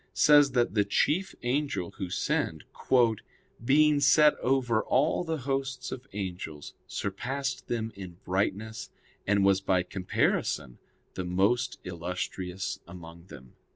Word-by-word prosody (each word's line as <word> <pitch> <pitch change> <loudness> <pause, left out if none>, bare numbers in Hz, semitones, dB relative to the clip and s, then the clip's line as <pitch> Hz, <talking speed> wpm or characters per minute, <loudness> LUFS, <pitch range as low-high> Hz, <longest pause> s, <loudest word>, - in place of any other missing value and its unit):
says 145 -2 +6
that 120 -2 +2
the 105 - +3
chief 160 - 0
angel 130 - -1
who 95 -3 -3
sinned, 80 -2 -1 1.0
"being 150 +3 +4
set 145 +2 +6
over 125 -4 +1
all 150 +6 +1
the 160 -2 -2
hosts 135 -1 -2
of 130 0 -7
angels, 90 -7 -6
surpassed 130 +6 -3
them 115 -1 -2
in 90 -3 -9
brightness, 105 +4 -2 0.4
and 100 -1 +3
was 100 0 +4
by 95 -2 +1
comparison 90 -9 -1 0.3
the 95 - -4
most 100 +8 +1
illustrious 90 +2 -4
among 85 -1 -11
them." 65 -8 -13
105 Hz, 120 wpm, -28 LUFS, 90-135 Hz, 1.0 s, says